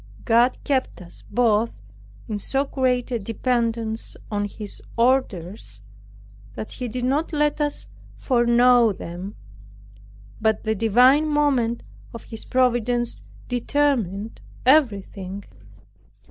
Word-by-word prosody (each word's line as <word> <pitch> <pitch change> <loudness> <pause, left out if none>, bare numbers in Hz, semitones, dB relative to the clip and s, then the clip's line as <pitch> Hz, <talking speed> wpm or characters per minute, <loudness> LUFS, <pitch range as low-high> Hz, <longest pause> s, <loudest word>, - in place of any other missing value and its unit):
God 240 +2 +4
kept 270 -2 -1
us 175 -2 -12
both 230 -1 +2 0.5
in 210 -2 -3
so 270 +7 0
great 255 -2 0
a 240 - 0
dependence 230 0 -2
on 205 -1 0
His 205 0 -8 0.2
orders, 200 - 0 0.7
that 110 - -6
He 250 - -4
did 245 +2 -3
not 290 +7 0
let 295 -1 +1
us 290 -1 -2 0.3
foreknow 240 -2 +4
them; 180 +3 -7 1.1
but 220 -1 +1
the 220 - 0
divine 250 +8 +4
moment 275 -6 +1 0.3
of 230 - -8
His 225 - -7
providence 240 -1 +1 0.3
determined 240 -5 -1 0.2
everything. 200 -8 +1
235 Hz, 105 wpm, -23 LUFS, 215-255 Hz, 1.1 s, God